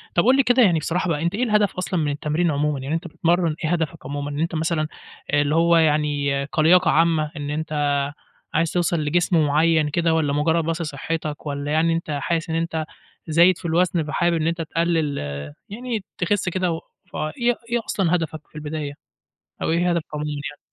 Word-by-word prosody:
طب 170 - +4
قُل 255 +2 +6
لي 275 - +5
كده 245 0 +4
يعني 170 -6 +4
بصراحة 175 +4 -1
بقى، 150 -2 0
أنت 170 +4 0
إيه 245 - 0
الهدف 210 -3 +2
أصلًا 185 -1 -1
من 150 -2 0
التمرين 155 +3 0
عمومًا؟ 145 -1 0
يعني 140 +5 -2
أنت 170 +1 -4
بتتمرن، 170 0 +1
إيه 155 - 0
هدفك 160 -6 -2
عمومًا؟ 145 +1 -4
إن 145 - -4
أنت 165 +1 -1
مثلًا 160 -1 0 0.4
آآ، 145 0 +4
اللي 145 +2 +1
هو 170 0 +4
يعني 145 -3 +1
كلياقة 170 +3 +4
عامة، 160 -2 +2
إن 145 0 -4
أنت 155 +1 -3 0.8
عايز 165 +1 +1
توصل 175 -2 +1
لجسم 160 +1 +2
معيّن 155 +1 +3
كده، 165 +1 +1
والّا 150 -3 +1
مجرد 160 +3 +2
بس 165 +1 -1
صحتك، 155 0 -4
والّا 145 0 -3
يعني 165 +2 +3
أنت 165 -2 -3
حاسس 165 -1 -1
إن 160 - -1
أنت 165 -1 -1 0.4
زايد 170 +3 +5
في - - -12
الوزن، 170 0 +2
فحابب 170 +3 +1
إن 155 - 0
أنت 165 0 -1
تقلّل، 165 -2 0 0.5
يعني 230 0 -4
تخس 185 +1 0
كده 185 -1 0
و 165 - -3 0.3
فإيه 235 - -1
إيه 240 - +2
أصلًا 180 -3 +1
هدفك 155 -2 -4
في - - -30
البداية، 150 -1 -4 0.7
أو - - 0
إيه 175 +2 +2
هدفك 170 -2 -1
عمومًا 150 0 -3
يعني؟ 145 0 -6
160 Hz, 195 wpm, -22 LUFS, 150-175 Hz, 0.8 s, قُل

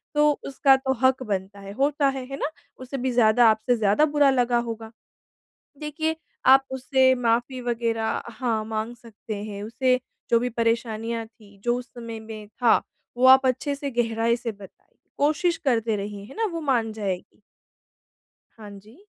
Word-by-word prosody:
तो 295 0 +5 0.2
उसका 275 0 +4
तो 265 0 -1
हक 260 0 +3
बनता 200 -2 -4
है, 195 0 -9
होता 280 +3 +1
है, 265 -1 -4
है 275 - -4
ना? 305 - -2 0.3
उसे 255 +2 -6
भी 255 0 -1
ज़्यादा 235 -1 +5
आपसे 220 +3 +2
ज़्यादा 215 +6 +3
बुरा 290 -1 +5
लगा 245 -2 +2
होगा। 225 -1 -7 0.9
देखिए, 315 +1 -2 0.3
आप 270 0 +7
उससे 260 0 +3
माफ़ी 245 +1 0
वगैरह 230 -2 -1
हाँ, 230 -2 -2
माँग 220 +2 -4
सकते 220 -2 -9
हैं। 205 -1 -6
उसे 255 +4 +1 0.3
जो 235 - +4
भी 245 +1 -1
परेशानियाँ 230 0 -1
थी, 210 -3 -20
जो 240 0 +2
उस 250 0 -7
समय 230 -2 -7
में 220 -1 -9
था, 240 0 +3 0.4
वो 250 - +3
आप 265 0 +8
अच्छे 260 +3 -1
से, 280 0 -4
गहराई 230 -1 +1
से 235 -1 -4
बताइए। 200 -2 -16 0.2
कोशिश 315 +4 +1
करते 230 -5 0
रहिए। 200 0 -5
है 270 - -13
ना? 450 - +1
वो 335 -5 -4
मान 240 -6 +1
जाएगी। 200 -4 -5 1.2
हाँ 215 -2 -11
जी। 215 - -18
240 Hz, 170 wpm, -24 LUFS, 220-265 Hz, 1.2 s, आप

